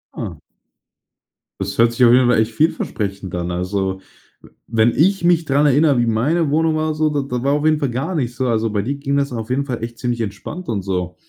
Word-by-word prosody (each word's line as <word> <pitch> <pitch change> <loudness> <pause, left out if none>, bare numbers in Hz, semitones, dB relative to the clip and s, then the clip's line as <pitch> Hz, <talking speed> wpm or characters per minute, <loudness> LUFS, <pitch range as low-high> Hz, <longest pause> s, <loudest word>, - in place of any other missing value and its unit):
Ah. - - -5 1.2
Das - - -4
hört 115 0 +4
sich 125 - +1
auf 120 - +6
jeden 125 0 +5
Fall 120 - +4
echt 110 +1 +1
vielversprechend 100 - -2
an. 85 0 -3
Also, 95 +1 -2 0.7
wenn 115 +1 +3
ich 190 +4 +2
mich 170 -2 +3
daran 145 +1 +3
erinnere, 145 -1 +3
wie 120 - +2
meine 145 +8 +1
Wohnung 160 +1 +2
war 155 0 0
so, 155 0 +1
da 145 -1 -1
da 125 -2 -4
war 140 - +2
auf 150 +1 0
jeden 155 -1 +3
Fall 140 -5 -1
gar 135 +9 -3
nicht 125 -5 -2
so, 130 -1 -1
also, 115 -1 +1
bei 105 -1 0
dir 135 +7 -3
ging 140 0 -2
das 140 -2 0
auf 115 -1 -5
jeden 140 +2 0
Fall 125 -4 -4
echt 115 0 -6
ziemlich 120 -2 -2
entspannt 155 - -6
und 100 -4 -2
so. 90 -2 -3
125 Hz, 230 wpm, -19 LUFS, 110-150 Hz, 1.2 s, auf